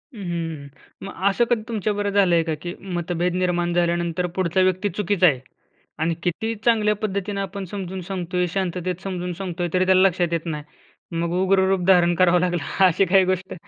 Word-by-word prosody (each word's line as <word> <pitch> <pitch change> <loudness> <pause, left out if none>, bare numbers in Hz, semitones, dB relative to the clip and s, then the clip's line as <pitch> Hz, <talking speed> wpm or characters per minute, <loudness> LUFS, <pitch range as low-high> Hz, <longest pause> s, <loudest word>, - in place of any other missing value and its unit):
हं, 210 - -8
हं. 165 -3 -7
मग 195 - -7 0.2
असं 235 +4 +2
कधी 235 -3 +2
तुमच्याबरोबर 205 -2 -1
झालंय 175 -4 +4
का, 160 -1 -2
की 175 0 -5 0.2
मतभेद 175 0 -1
निर्माण 175 -1 0
झाल्यानंतर 170 0 0
पुढचा 185 0 +1
व्यक्ती 185 +2 +1
चुकीचा 190 -1 +2
आहे 140 -6 +2 0.6
आणि 165 +1 +1
कितीही 220 +6 -2
चांगल्या 215 -3 +3
पद्धतीनं 200 -1 -3
आपण 195 0 -5
समजून 190 -2 -5
सांगतोय, 180 -1 -2
शांततेत 185 -1 -2
समजून 180 -2 -4
सांगतोय, 175 -1 -4
तरी 185 0 +2
त्याला 185 0 +4
लक्षात 175 -2 -1
येत 165 0 -2
नाही. 150 -3 -4 0.6
मग 170 0 -1
उग्र 190 0 +3
रूप 190 -2 +1
धारण 175 -2 +5
करावं 180 0 +4
लागलं, 175 -3 -1 0.2
अशी 185 +2 +3
काही 190 0 +4
गोष्ट? 185 0 -2
180 Hz, 175 wpm, -22 LUFS, 175-195 Hz, 0.6 s, धारण